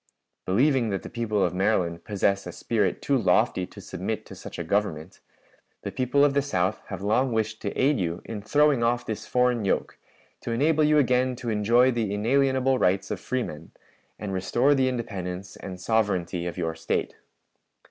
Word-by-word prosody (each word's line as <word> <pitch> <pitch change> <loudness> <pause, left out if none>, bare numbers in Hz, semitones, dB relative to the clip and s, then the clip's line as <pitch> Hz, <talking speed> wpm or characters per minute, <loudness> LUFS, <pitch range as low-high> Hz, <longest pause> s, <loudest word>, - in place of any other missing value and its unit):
"Believing 125 +4 +3
that 95 -4 -3
the - - -9
people 110 -4 0
of 90 - 0
Maryland 90 -3 0
possess 100 -1 0
a - - -5
spirit 105 -5 -1
too 140 - +2
lofty 95 -4 +2
to - - -13
submit - - -4
to - - -11
such - - -9
a - - -3
Government, 95 -5 -2 0.6
the - - -4
people 130 +3 +2
of 145 - +2
the 140 - +3
South 95 -8 -1
have - - -6
long 120 +6 +2
wished 110 0 -1
to 100 - -2
aid 140 0 +3
yon 85 -1 -2
in 110 -3 -6
throwing 145 +3 +3
off 120 +1 +1
this 110 - -5
foreign 125 -2 +2
yoke, 100 - -1 0.4
to - - -6
enable 150 +7 +2
you 150 0 +4
again 125 -2 +2
to 120 -1 -4
enjoy 115 +5 +4
the 115 -4 -1
inalienable 130 +3 +2
rights 95 +2 +1
of - - -3
freemen, 85 -12 -4 0.4
and 100 -2 -5
restore 120 +9 +2
the 135 -2 +2
independence 95 -6 -5
and 95 -2 -8
sovereignty 90 -5 0
of 85 - -5
your 80 -2 -1
State. 80 - -2
110 Hz, 180 wpm, -26 LUFS, 95-130 Hz, 0.6 s, you